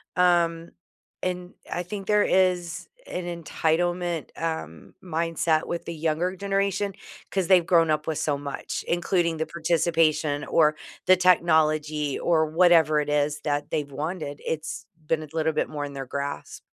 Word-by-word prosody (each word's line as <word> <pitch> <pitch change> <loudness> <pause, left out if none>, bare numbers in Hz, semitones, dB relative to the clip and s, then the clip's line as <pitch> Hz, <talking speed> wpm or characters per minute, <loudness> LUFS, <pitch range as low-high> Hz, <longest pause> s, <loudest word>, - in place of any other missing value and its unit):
Um, 170 -2 +2 0.5
and 180 0 -3 0.2
I 175 - -2
think 195 +2 -7
there 210 -1 +4
is 180 -3 +1 0.2
an 180 - -4 0.2
entitlement, 175 +1 0
um, 160 - -4
mindset 165 -2 0
with 170 - -4
the 170 - -5
younger 165 +3 -1
generation, 200 +1 -1 0.4
'cause 190 -3 0
they've 180 -3 +5
grown 165 -2 +4
up 150 0 +1
with 160 -2 -1
so 145 -2 0
much, 140 -1 -5
including 175 -1 +1
the 160 - -1
participation, 160 -3 +1
or, 155 -2 +3 0.3
the 185 - +7
technology 155 -4 +2
or 160 -2 +2
whatever 160 -2 +4
it 150 - -2
is, 150 0 +1
that 145 -1 -2
they've 145 -2 -2
wanted, 150 0 -4
it's 155 -1 -4 0.2
been 155 -1 0
a - - -9
little 160 0 0
bit 155 - 0
more 145 -1 -4
in 140 - -8
their 135 -1 -5
grasp. 140 +2 -5
165 Hz, 155 wpm, -25 LUFS, 155-175 Hz, 0.5 s, the